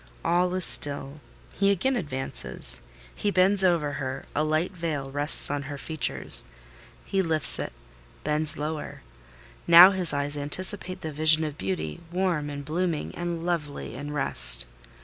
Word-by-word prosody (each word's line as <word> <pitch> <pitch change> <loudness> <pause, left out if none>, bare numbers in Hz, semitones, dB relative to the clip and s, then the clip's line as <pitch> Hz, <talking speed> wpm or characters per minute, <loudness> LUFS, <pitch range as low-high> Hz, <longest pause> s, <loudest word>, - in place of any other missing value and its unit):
All 180 +1 +1
is 185 - +1
still: 145 0 +5 0.3
he 200 0 +1
again 200 +8 0
advances: 135 - -2 0.3
he 205 - -2
bends 190 +1 +3
above 175 -3 +3
her; 135 -2 -5
a 150 - +1
light 155 +4 -1
veil 155 -7 -5
rests 145 +1 +4
on 145 0 -2
her 145 - -6
features: 140 - +1 0.6
he 195 - 0
lifts 160 -4 +1
it, - - -4 0.5
bends 150 0 -2
lower; 150 - -6 0.6
now 175 +3 +9
his 185 -4 +1
eyes 145 +1 -2
anticipate 185 +6 -2
the 160 - -5
vision 155 +1 +3
of 150 -2 -4
beauty—warm, 150 - -3
and 145 -1 -7
blooming, 165 +1 -3
and 170 -1 -5
lovely, 150 -9 -4
in 145 +4 -7
rest. 135 - +1
155 Hz, 145 wpm, -25 LUFS, 145-180 Hz, 0.6 s, now